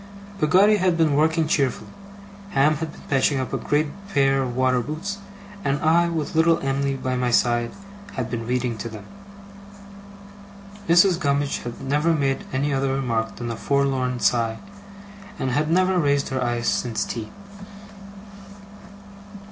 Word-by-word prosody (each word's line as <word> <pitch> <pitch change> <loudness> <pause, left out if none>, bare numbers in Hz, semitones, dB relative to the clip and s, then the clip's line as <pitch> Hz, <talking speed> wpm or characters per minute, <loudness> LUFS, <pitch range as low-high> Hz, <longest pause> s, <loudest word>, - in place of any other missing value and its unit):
Peggotty 195 +7 +5
had 185 -3 +1
been 160 -3 +3
working 160 +2 +2
cheerfully. 140 -4 -1 0.6
Ham 150 +3 +3
had 160 0 -4
been - - -15
patching 135 0 +1
up 130 - -4
a - - +1
great 150 +1 +1 0.3
pair 135 -3 +3
of 125 -2 -3
waterboots; 150 +10 -1 0.4
and 140 -2 0
I, 170 +2 +3
with 160 -3 -3
little 165 +1 +4
Em'ly 135 0 -1
by 130 -1 -2
my 125 -1 0
side, 120 0 +2 0.4
had 125 -3 -3
been 115 -2 -5
reading 125 -2 -1
to 115 - -5
them. 110 -2 -10 1.8
Mrs. 175 +1 +5
Gummidge 140 -2 0
had 120 -1 -7
never 150 +5 +1
made 135 -3 -1
any 140 +2 0
other 135 0 0
remark 115 -4 -2
than 120 -1 -5
a - - -4
forlorn 130 -1 0
sigh, 115 -2 +1 0.8
and 130 - -2
had 150 +4 0
never 185 +2 +3
raised 145 -2 +1
her 130 -1 -1
eyes 120 -1 -1
since 115 -3 0
tea. 110 -2 -5
135 Hz, 150 wpm, -23 LUFS, 125-155 Hz, 1.8 s, Peggotty